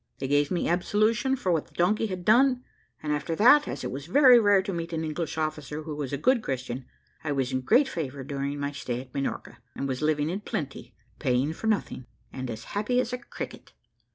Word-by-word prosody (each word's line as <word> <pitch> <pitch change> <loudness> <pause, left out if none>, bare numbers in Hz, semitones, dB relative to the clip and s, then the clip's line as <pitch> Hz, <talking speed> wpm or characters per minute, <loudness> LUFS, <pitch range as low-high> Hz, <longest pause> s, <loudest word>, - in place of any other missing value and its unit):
They 135 - -3
gave 145 +1 +2
me 175 - 0
absolution 215 +9 +2
for 190 -8 -1
what 160 -3 0
the - - -26
donkey 210 +6 +2
had 185 -3 -6
done, 250 +4 +4 0.4
and 150 -1 0
after 155 +3 -2
that, 290 - +6
as - - -5
it - - -3
was 140 +3 -6
very 255 +3 +7
rare 205 -3 +4
to 195 0 -3
meet 170 0 -4
an 160 0 -1
English 155 0 -3
officer 155 -1 -3
who 155 -1 -5
was 145 -3 -4
a 140 - -1
good 240 - +3
Christian, 130 - -4 0.4
I 150 - -2
was 135 -2 -1
in 130 0 -1
great 245 - +4
favour 145 - -4
during 140 +1 -3
my 140 0 -2
stay 125 -4 -4
at 130 0 -11
Minorca, 140 -1 -4 0.2
and 140 - -3
was 130 0 -3
living 155 0 +1
in 190 - -2
plenty, 145 -8 -5 0.2
paying 135 +2 +1
for 220 - -5
nothing, 200 - -1 0.3
and 130 -1 -5
as 110 -1 -6
happy 215 +5 +1
as 250 0 -1
a 250 - -2
cricket. 245 - -8
155 Hz, 220 wpm, -27 LUFS, 140-210 Hz, 0.4 s, very